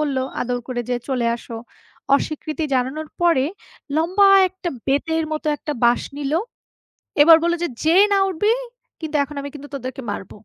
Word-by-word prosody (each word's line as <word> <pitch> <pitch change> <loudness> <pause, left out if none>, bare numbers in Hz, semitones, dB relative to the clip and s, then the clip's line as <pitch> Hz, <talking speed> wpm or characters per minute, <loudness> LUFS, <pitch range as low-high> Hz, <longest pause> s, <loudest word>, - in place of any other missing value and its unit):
বলল, 290 -3 -1 0.2
আদর 245 0 -1
করে 250 -1 -2
যেয়ে 245 -1 -1
চলে 250 -3 0
আসো। 230 -1 -9 0.6
অস্বীকৃতি 310 +2 -2
জানানোর 265 +5 -1
পরে 335 -7 +3 0.5
লম্বা 370 +5 +4 0.2
একটা 370 -1 -6 0.2
বেতের 320 +4 0
মতো 310 0 -4
একটা 300 - -5
বাঁশ 240 +1 +4
নিল। 285 -1 -3 0.9
এবার 325 +2 +9
বলল 340 0 +2
যে, 345 - 0
যেয়ে 340 +6 +5
না 400 - +4
উঠবি, 400 +4 +1 0.5
কিন্তু 315 -2 -3
এখন 290 +1 -11
আমি 280 - -6
কিন্তু 290 0 -9
তোদেরকে 260 0 -6
মারব। 195 -2 -6
300 Hz, 160 wpm, -21 LUFS, 260-330 Hz, 0.9 s, এবার